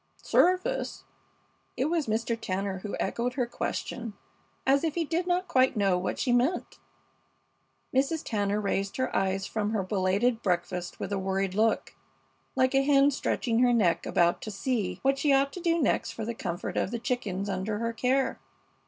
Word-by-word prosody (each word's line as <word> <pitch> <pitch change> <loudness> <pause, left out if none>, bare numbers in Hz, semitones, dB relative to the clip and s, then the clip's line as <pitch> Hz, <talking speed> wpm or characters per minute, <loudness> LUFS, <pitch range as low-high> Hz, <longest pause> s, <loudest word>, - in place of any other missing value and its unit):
"Service?" 365 +1 +1 0.7
It 260 - +1
was 320 -2 0
Mr. 225 +2 0
Tanner 195 -3 -3
who 205 +2 -5
echoed 245 +1 -1
her 255 -2 0
question 235 -1 -4 0.5
as 275 +2 +3
if 320 -2 -1
he 335 -1 0
did 340 +4 -1
not 360 +1 +1
quite 260 -5 +3
know 195 -3 +3
what 180 +1 -2
she 255 - 0
meant. 255 +9 0 1.1
Mrs. 280 +4 +1
Tanner 205 -2 0
raised 195 -1 -1
her 260 - -1
eyes 195 0 0
from 215 0 -2
her 205 -3 0
belated 200 +5 +1
breakfast 180 -1 -2
with - - -3
a 195 - 0
worried 190 0 -1
look, 220 +3 +1 0.6
like 260 0 +2
a 270 - +4
hen 280 0 +4
stretching 235 -3 0
her 245 -1 +4
neck 195 -8 +2
about 170 0 +2
to - - -5
see 215 0 -2
what 275 0 +2
she 295 - +2
ought 275 +1 +3
to 360 - -6
do 335 -1 +2
next 275 - +1
for 220 - -5
the 235 - -3
comfort 175 -6 -4
of - - +1
the 235 - -3
chickens 225 -6 -2
under 200 +2 -2
her 230 +1 -2
care. 260 +3 +1
230 Hz, 180 wpm, -28 LUFS, 195-270 Hz, 1.1 s, a